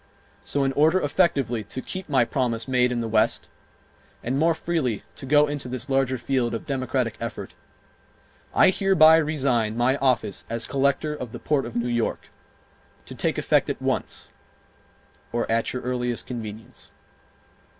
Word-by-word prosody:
So 140 Hz, -, 0 dB
in 135 Hz, 0 st, 0 dB
order 160 Hz, +6 st, +4 dB
effectively 145 Hz, -, +1 dB
to 120 Hz, -, -6 dB
keep 185 Hz, +6 st, -6 dB
my 130 Hz, -4 st, +3 dB
promise 115 Hz, -3 st, -1 dB
made 125 Hz, -1 st, +2 dB
in 120 Hz, -1 st, -1 dB
the 115 Hz, -, -3 dB
West 110 Hz, 0 st, +1 dB, 0.7 s
and 130 Hz, +4 st, -1 dB
more 165 Hz, +1 st, +3 dB
freely 160 Hz, -10 st, -2 dB
to 135 Hz, -, -9 dB
go 150 Hz, +2 st, +5 dB
into 145 Hz, -3 st, -4 dB
this 130 Hz, +2 st, -4 dB
larger 135 Hz, -1 st, +1 dB
field 120 Hz, -1 st, -1 dB
of 115 Hz, -, -6 dB
democratic 130 Hz, -4 st, -1 dB
effort, 115 Hz, -, -6 dB, 1.0 s
I -, -, +5 dB
hereby 180 Hz, -5 st, +6 dB
resign 130 Hz, -8 st, 0 dB
my 130 Hz, +3 st, +2 dB
office 125 Hz, -7 st, 0 dB
as 115 Hz, 0 st, -2 dB
Collector 140 Hz, +2 st, 0 dB
of 125 Hz, -6 st, -7 dB
the -, -, -6 dB
Port 140 Hz, -5 st, 0 dB
of 120 Hz, -, -10 dB
New 120 Hz, 0 st, 0 dB
York, 120 Hz, -1 st, -2 dB, 0.8 s
to -, -, -9 dB
take -, -, -1 dB
effect -, -, +2 dB
at -, -, -3 dB
once, -, -, -3 dB, 1.0 s
or 120 Hz, 0 st, -1 dB
at 115 Hz, 0 st, +1 dB
your 125 Hz, -, -5 dB
earliest 125 Hz, -1 st, -2 dB
convenience. 110 Hz, -3 st, -8 dB
130 Hz, 160 wpm, -24 LUFS, 120-145 Hz, 1.0 s, hereby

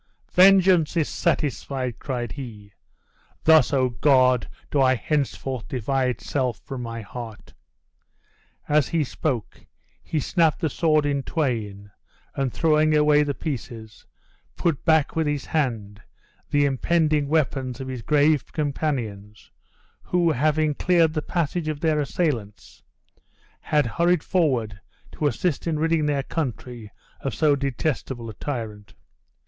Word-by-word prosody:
"Vengeance 185 Hz, -3 st, +5 dB
is 155 Hz, -, +2 dB
satisfied," 135 Hz, -6 st, -2 dB
cried 125 Hz, -4 st, -4 dB
he; 105 Hz, -7 st, -9 dB, 0.7 s
"thus, 160 Hz, -4 st, +5 dB
O 130 Hz, -3 st, +2 dB
God! 130 Hz, -1 st, +3 dB, 0.2 s
do 140 Hz, -, +2 dB
I 130 Hz, -1 st, +4 dB
henceforth 135 Hz, -2 st, -2 dB
divide 130 Hz, 0 st, -1 dB
self 130 Hz, -5 st, -1 dB
from 135 Hz, -2 st, -6 dB
my 115 Hz, -1 st, -5 dB
heart!" 110 Hz, 0 st, -9 dB, 1.1 s
As 150 Hz, -1 st, +3 dB
he 165 Hz, -2 st, 0 dB
spoke 130 Hz, -, -4 dB, 0.3 s
he 155 Hz, -, -2 dB
snapped 160 Hz, +1 st, +1 dB
the 160 Hz, -, -1 dB
sword 155 Hz, -2 st, +2 dB
in 140 Hz, -1 st, 0 dB
twain, 110 Hz, -, -3 dB, 0.4 s
and 135 Hz, -2 st, -1 dB
throwing 155 Hz, 0 st, +3 dB
away 150 Hz, 0 st, +4 dB
the 145 Hz, -2 st, -1 dB
pieces, 120 Hz, -7 st, -7 dB, 0.5 s
put 165 Hz, -5 st, -1 dB
back 160 Hz, -3 st, +3 dB
with 160 Hz, -1 st, +1 dB
his 145 Hz, -2 st, -2 dB
hand 110 Hz, -9 st, -2 dB, 0.5 s
the 145 Hz, 0 st, +3 dB
impending 150 Hz, +2 st, +1 dB
weapons 135 Hz, -4 st, 0 dB
of 130 Hz, -, -6 dB
his 130 Hz, -2 st, -5 dB
brave 150 Hz, +1 st, +2 dB
companions, 120 Hz, -9 st, -3 dB, 0.5 s
who 175 Hz, -2 st, +1 dB
having 155 Hz, +2 st, +1 dB
cleared 165 Hz, 0 st, +2 dB
the 155 Hz, -, -1 dB
passage 170 Hz, 0 st, -2 dB
of 155 Hz, -2 st, -3 dB
their 155 Hz, -1 st, +1 dB
assailants, 140 Hz, -, -3 dB, 0.8 s
had 150 Hz, -2 st, +1 dB
hurried 170 Hz, +6 st, +1 dB
forward 125 Hz, -, 0 dB, 0.3 s
to 150 Hz, -, -1 dB
assist 170 Hz, +2 st, -1 dB
in 160 Hz, -2 st, 0 dB
ridding 160 Hz, -1 st, +1 dB
their 140 Hz, -2 st, 0 dB
country 125 Hz, -7 st, -5 dB, 0.3 s
of 135 Hz, -5 st, -4 dB
so 150 Hz, +3 st, +3 dB
detestable 130 Hz, -2 st, -3 dB
a -, -, -12 dB
tyrant. 110 Hz, -5 st, -6 dB
140 Hz, 130 wpm, -24 LUFS, 125-155 Hz, 1.1 s, Vengeance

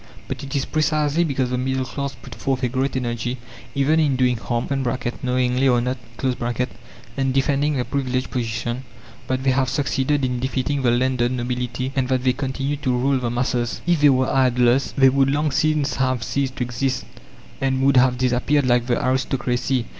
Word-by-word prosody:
But -, -, -5 dB
it 140 Hz, +2 st, -5 dB
is 135 Hz, -, 0 dB
precisely 155 Hz, +1 st, +1 dB
because 135 Hz, -5 st, -1 dB
the 125 Hz, -, 0 dB
middle 130 Hz, 0 st, -1 dB
class 140 Hz, +2 st, -4 dB
put 125 Hz, -, -11 dB
forth 130 Hz, +3 st, -2 dB
a -, -, +3 dB
great 130 Hz, +3 st, -1 dB
energy, 120 Hz, 0 st, -2 dB, 0.4 s
even 145 Hz, +3 st, +3 dB
in 145 Hz, -4 st, +2 dB
doing 125 Hz, -1 st, +2 dB
harm 120 Hz, +1 st, -2 dB, 0.5 s
(knowingly 125 Hz, 0 st, +1 dB
or 125 Hz, -2 st, +4 dB
not) 125 Hz, +2 st, -2 dB, 1.2 s
and 135 Hz, -1 st, +1 dB
defending 145 Hz, +2 st, +2 dB
their 125 Hz, -, 0 dB
privileged 130 Hz, -1 st, -2 dB
position, 120 Hz, +1 st, -3 dB, 0.4 s
that 130 Hz, 0 st, -1 dB
they 135 Hz, -, +3 dB
have 130 Hz, 0 st, +1 dB
succeeded 140 Hz, 0 st, 0 dB
in 125 Hz, -1 st, -2 dB
defeating 130 Hz, +2 st, -1 dB
the 125 Hz, -, +2 dB
landed 125 Hz, 0 st, +1 dB
nobility, 125 Hz, +1 st, -3 dB
and 130 Hz, -2 st, +1 dB
that 130 Hz, -1 st, +1 dB
they 130 Hz, -1 st, +3 dB
continue 135 Hz, +1 st, -2 dB
to 130 Hz, -4 st, 0 dB
rule 135 Hz, +2 st, +2 dB
the 120 Hz, -2 st, -2 dB
masses. 120 Hz, -1 st, -1 dB
If 170 Hz, -3 st, +2 dB
they 145 Hz, -, +7 dB
were 130 Hz, -1 st, +3 dB
idlers, 125 Hz, 0 st, +3 dB
they 135 Hz, -1 st, +7 dB
would 135 Hz, +1 st, +3 dB
long 150 Hz, +2 st, +1 dB
since 150 Hz, -1 st, +1 dB
have 130 Hz, -3 st, 0 dB
ceased 135 Hz, 0 st, -2 dB
to -, -, -1 dB
exist, 125 Hz, +2 st, -2 dB, 0.6 s
and 135 Hz, -1 st, +1 dB
would 135 Hz, -1 st, +4 dB
have 125 Hz, 0 st, +4 dB
disappeared 130 Hz, +3 st, +1 dB
like 120 Hz, -1 st, +2 dB
the 120 Hz, -, +2 dB
aristocracy. 130 Hz, -2 st, 0 dB
130 Hz, 185 wpm, -22 LUFS, 125-135 Hz, 1.2 s, they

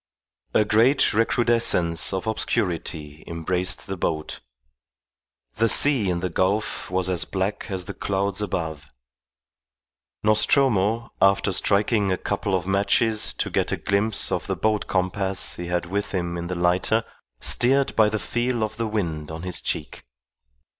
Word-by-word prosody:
A 105 Hz, -, +4 dB
great 115 Hz, +7 st, +3 dB
recrudescence 115 Hz, -7 st, +2 dB
of 95 Hz, -1 st, -3 dB
obscurity 80 Hz, -8 st, -3 dB
embraced 90 Hz, +2 st, -2 dB
the 95 Hz, -, -4 dB
boat. 80 Hz, -3 st, -3 dB, 1.2 s
The 115 Hz, +1 st, +3 dB
sea 130 Hz, -8 st, +4 dB
in 85 Hz, -1 st, -1 dB
the 90 Hz, -, -1 dB
gulf 95 Hz, +5 st, -1 dB
was 90 Hz, 0 st, 0 dB
as 90 Hz, -4 st, +1 dB
black 95 Hz, +2 st, -3 dB
as 95 Hz, -2 st, -3 dB
the -, -, -5 dB
clouds 100 Hz, 0 st, -1 dB
above. 80 Hz, -7 st, -4 dB, 1.3 s
Nostromo, 110 Hz, 0 st, +2 dB
after 100 Hz, 0 st, +3 dB
striking 100 Hz, +2 st, +2 dB
a 95 Hz, -, +1 dB
couple 100 Hz, 0 st, -2 dB
of 90 Hz, -1 st, -2 dB
matches 100 Hz, +3 st, +2 dB
to -, -, -3 dB
get -, -, 0 dB
a -, -, -1 dB
glimpse 100 Hz, +2 st, 0 dB
of -, -, -2 dB
the -, -, -1 dB
boat 110 Hz, -1 st, 0 dB
compass 95 Hz, +1 st, -1 dB
he 85 Hz, -, -5 dB
had 90 Hz, 0 st, -1 dB
with 100 Hz, +4 st, -3 dB
him 85 Hz, -1 st, -2 dB
in 85 Hz, 0 st, -4 dB
the 90 Hz, -, -3 dB
lighter, 90 Hz, +6 st, +1 dB, 0.4 s
steered 135 Hz, +3 st, +2 dB
by 110 Hz, -1 st, +5 dB
the 110 Hz, -, -1 dB
feel 120 Hz, +1 st, -1 dB
of 110 Hz, 0 st, -4 dB
the 115 Hz, -1 st, -1 dB
wind 85 Hz, -8 st, -3 dB
on 80 Hz, +1 st, -7 dB
his 90 Hz, -1 st, -1 dB
cheek. -, -, -3 dB
100 Hz, 150 wpm, -24 LUFS, 90-110 Hz, 1.3 s, by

